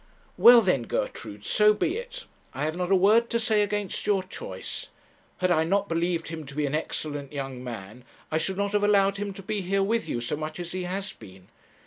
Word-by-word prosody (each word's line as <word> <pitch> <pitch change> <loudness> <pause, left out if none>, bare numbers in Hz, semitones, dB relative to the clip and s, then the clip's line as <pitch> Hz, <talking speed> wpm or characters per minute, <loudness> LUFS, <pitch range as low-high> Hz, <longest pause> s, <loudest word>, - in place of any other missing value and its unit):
'Well, 240 -1 +8
then, 180 -10 +2
Gertrude, 105 0 -4
so 210 0 +4
be 335 - 0
it. - - -7 0.3
I - - -1
have 155 +1 -2
not 180 +1 -2
a - - +7
word 215 +5 +4
to 235 - +1
say 220 -2 +2
against 205 -1 -2
your 200 -3 +2
choice. 95 - -7 0.5
Had 185 -1 +1
I 160 -2 +4
not 200 +4 +1
believed 170 -1 -1
him 160 -1 -6
to 140 - -10
be 150 0 0
an 140 - -2
excellent 145 -2 -3
young 135 -3 -5
man, 115 -1 -8 0.3
I 155 - +1
should 190 +4 -2
not 200 0 0
have 205 0 +1
allowed 200 -1 +4
him 205 0 -3
to 195 - -9
be 205 +2 -2
here 195 +2 +1
with 225 +3 0
you 120 - -1
so 120 +4 -2
much 155 +2 -5
as 175 0 -5
he 185 -1 -3
has 195 +2 -3
been. 95 - -15
185 Hz, 225 wpm, -26 LUFS, 150-205 Hz, 0.5 s, Well